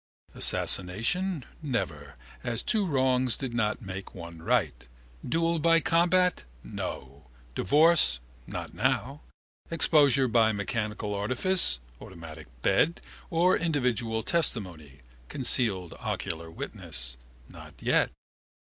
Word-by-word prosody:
Assassination, 125 Hz, -, +2 dB, 0.2 s
never, 90 Hz, -, -3 dB, 0.3 s
as 115 Hz, -2 st, -2 dB
two 210 Hz, -4 st, +1 dB
wrongs 130 Hz, -4 st, +2 dB
did 130 Hz, -3 st, -5 dB
not 110 Hz, -2 st, -1 dB
make 95 Hz, 0 st, -7 dB
one 85 Hz, -2 st, -9 dB
right. -, -, 0 dB, 0.4 s
Duel 165 Hz, +5 st, 0 dB
by 165 Hz, +1 st, +5 dB
combat, 180 Hz, -, +2 dB, 0.2 s
no. 65 Hz, 0 st, -7 dB, 0.3 s
Divorce, 150 Hz, -, +4 dB, 0.3 s
not -, -, -6 dB
now. 140 Hz, +4 st, -1 dB, 0.5 s
Exposure 145 Hz, -5 st, +3 dB
by 115 Hz, -2 st, +3 dB
mechanical 105 Hz, 0 st, -3 dB
artifice 125 Hz, -, +1 dB, 0.2 s
(automatic 80 Hz, -4 st, -10 dB, 0.2 s
bed) 165 Hz, +3 st, +2 dB, 0.3 s
or 175 Hz, +2 st, +3 dB
individual 125 Hz, -8 st, -1 dB
testimony 90 Hz, -, -1 dB, 0.3 s
(concealed 110 Hz, -9 st, +1 dB
ocular 80 Hz, 0 st, -4 dB
witnesses), 65 Hz, -5 st, -5 dB, 0.3 s
not -, -, -13 dB
yet. -, -, +2 dB
120 Hz, 100 wpm, -28 LUFS, -, 0.5 s, by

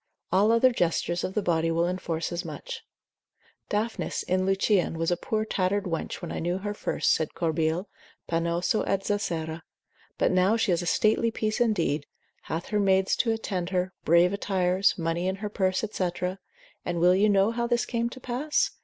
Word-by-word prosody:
All 200 Hz, +5 st, +4 dB
other 230 Hz, +3 st, +5 dB
gestures 175 Hz, -4 st, 0 dB
of 185 Hz, -, -3 dB
the 210 Hz, -, +1 dB
body 165 Hz, -2 st, +1 dB
will 165 Hz, +1 st, +1 dB
enforce 175 Hz, -2 st, -3 dB
as 175 Hz, 0 st, -3 dB
much. -, -, -7 dB, 0.9 s
Daphnis 220 Hz, +2 st, -2 dB
in 185 Hz, +1 st, 0 dB
Lucian 195 Hz, -3 st, +2 dB
was 165 Hz, +1 st, 0 dB
a -, -, +3 dB
poor 215 Hz, +4 st, -2 dB
tattered 200 Hz, 0 st, 0 dB
wench 170 Hz, -1 st, -4 dB
when 170 Hz, -, -4 dB
I -, -, -3 dB
knew 175 Hz, +2 st, -1 dB
her 205 Hz, +2 st, -4 dB
first, -, -, +1 dB
said 160 Hz, -1 st, -2 dB
Corbile, 165 Hz, +2 st, 0 dB, 0.4 s
pannosa 170 Hz, +5 st, 0 dB
et 195 Hz, 0 st, 0 dB
Zacera, 165 Hz, -5 st, -2 dB, 0.6 s
but -, -, +2 dB
now 185 Hz, +4 st, +3 dB
she 225 Hz, -4 st, +1 dB
is 175 Hz, -, +1 dB
a 175 Hz, -, -4 dB
stately 220 Hz, +5 st, +3 dB
piece 220 Hz, +1 st, -2 dB
indeed, 170 Hz, -11 st, +1 dB, 0.4 s
hath 165 Hz, +2 st, -4 dB
her 210 Hz, -, +1 dB
maids 190 Hz, -1 st, +3 dB
to 235 Hz, -, +1 dB
attend 190 Hz, -5 st, -2 dB
her, 185 Hz, 0 st, -1 dB
brave 170 Hz, +3 st, +4 dB
attires, 190 Hz, -1 st, +1 dB
money 170 Hz, +1 st, -1 dB
in 190 Hz, -, 0 dB
her 210 Hz, +1 st, -5 dB
purse, 190 Hz, 0 st, 0 dB
&c., 185 Hz, -4 st, 0 dB, 0.7 s
and 175 Hz, -1 st, -2 dB
will 180 Hz, +2 st, +5 dB
you 200 Hz, +3 st, +4 dB
know 200 Hz, +1 st, +4 dB
how 235 Hz, 0 st, -1 dB
this 240 Hz, 0 st, +1 dB
came 235 Hz, -1 st, -1 dB
to 260 Hz, -, -10 dB
pass? 255 Hz, +5 st, 0 dB
185 Hz, 185 wpm, -27 LUFS, 170-210 Hz, 0.9 s, other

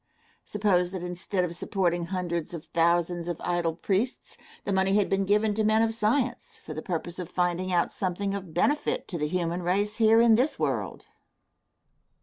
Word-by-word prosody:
Suppose 190 Hz, -4 st, +1 dB
that 185 Hz, -2 st, -4 dB
instead 180 Hz, +2 st, -2 dB
of 170 Hz, -1 st, -5 dB
supporting 175 Hz, -1 st, 0 dB
hundreds 175 Hz, -2 st, -3 dB
of 160 Hz, -, -8 dB
thousands 170 Hz, +1 st, +1 dB
of 175 Hz, -2 st, -3 dB
idle 170 Hz, -2 st, 0 dB
priests, 200 Hz, +8 st, -2 dB, 0.3 s
the 200 Hz, -, -2 dB
money 190 Hz, +1 st, +2 dB
had 205 Hz, -1 st, +2 dB
been 195 Hz, 0 st, +2 dB
given 210 Hz, +2 st, +2 dB
to 220 Hz, +1 st, 0 dB
men 215 Hz, +1 st, +4 dB
of 225 Hz, 0 st, +1 dB
science, 240 Hz, +3 st, -1 dB
for 155 Hz, -, -6 dB
the 155 Hz, -, -5 dB
purpose 175 Hz, +1 st, -4 dB
of 180 Hz, -, -5 dB
finding 180 Hz, +1 st, 0 dB
out 175 Hz, -1 st, +2 dB
something 195 Hz, +1 st, -2 dB
of 190 Hz, -4 st, -5 dB
benefit 295 Hz, -, 0 dB
to 170 Hz, -, -3 dB
the 150 Hz, -, 0 dB
human 175 Hz, +1 st, -1 dB
race 200 Hz, +4 st, 0 dB
here 225 Hz, 0 st, +5 dB
in 230 Hz, -1 st, +6 dB
this 255 Hz, +7 st, +2 dB
world. -, -, -2 dB
185 Hz, 180 wpm, -27 LUFS, 175-210 Hz, 0.3 s, in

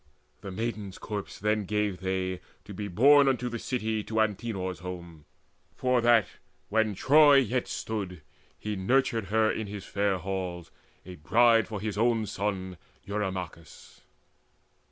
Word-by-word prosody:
The 100 Hz, -, -7 dB
maiden's 105 Hz, -1 st, -4 dB
corpse 105 Hz, -2 st, -6 dB
then 105 Hz, 0 st, 0 dB
gave 105 Hz, -2 st, -1 dB
they, 95 Hz, -1 st, -2 dB, 0.2 s
to 105 Hz, -, -9 dB
be 105 Hz, +2 st, -5 dB
borne 140 Hz, +9 st, +6 dB
Unto 125 Hz, -2 st, +1 dB
the 120 Hz, 0 st, -5 dB
city, 110 Hz, -4 st, -2 dB
to 110 Hz, 0 st, -2 dB
Antenor's 105 Hz, -3 st, -1 dB
home, 85 Hz, -4 st, -8 dB, 0.5 s
For 125 Hz, -1 st, +1 dB
that, 115 Hz, -2 st, +5 dB, 0.4 s
when 110 Hz, -1 st, +1 dB
Troy 145 Hz, +6 st, +6 dB
yet 125 Hz, -2 st, +2 dB
stood, 95 Hz, -7 st, -5 dB, 0.3 s
he 105 Hz, 0 st, -4 dB
nurtured 115 Hz, +3 st, +1 dB
her 110 Hz, +2 st, +2 dB
In 110 Hz, -, -4 dB
his 100 Hz, -1 st, -7 dB
fair 100 Hz, -1 st, 0 dB
halls, 90 Hz, -2 st, -5 dB, 0.3 s
a 90 Hz, -1 st, -9 dB
bride 115 Hz, +9 st, +4 dB
for 105 Hz, -2 st, -5 dB
his 105 Hz, 0 st, -3 dB
own 115 Hz, -1 st, +2 dB
son 95 Hz, -3 st, -3 dB, 0.3 s
Eurymachus. 95 Hz, -6 st, -6 dB
105 Hz, 140 wpm, -28 LUFS, 95-115 Hz, 0.5 s, borne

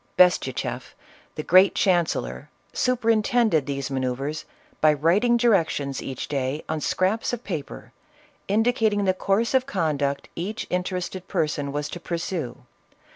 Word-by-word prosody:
Bestucheff, 180 Hz, -8 st, +2 dB, 0.4 s
the 155 Hz, -, -4 dB
great 185 Hz, +4 st, +5 dB
chancellor, 165 Hz, -, 0 dB, 0.2 s
superintend 230 Hz, -2 st, +2 dB
ed 150 Hz, -4 st, +2 dB
these 140 Hz, -1 st, -3 dB
manoeuvres 135 Hz, +3 st, -2 dB, 0.4 s
by 155 Hz, -, +6 dB
writing 190 Hz, -, +3 dB
directions 165 Hz, -, +1 dB
each 130 Hz, -2 st, -5 dB
day, 140 Hz, +1 st, -2 dB
on 160 Hz, -1 st, -2 dB
scraps 195 Hz, -, 0 dB
of 245 Hz, 0 st, -4 dB
paper, 160 Hz, -8 st, -6 dB, 0.6 s
indicating 220 Hz, -1 st, +2 dB
the 185 Hz, -, +3 dB
course 200 Hz, +6 st, 0 dB
of 260 Hz, 0 st, +2 dB
conduct 145 Hz, -, -1 dB
each 200 Hz, +6 st, -4 dB
interested 180 Hz, 0 st, -3 dB
person 145 Hz, -2 st, -1 dB
was 145 Hz, 0 st, -2 dB
to 175 Hz, -, -6 dB
pursue. 165 Hz, -7 st, -4 dB
175 Hz, 130 wpm, -24 LUFS, 145-205 Hz, 0.6 s, by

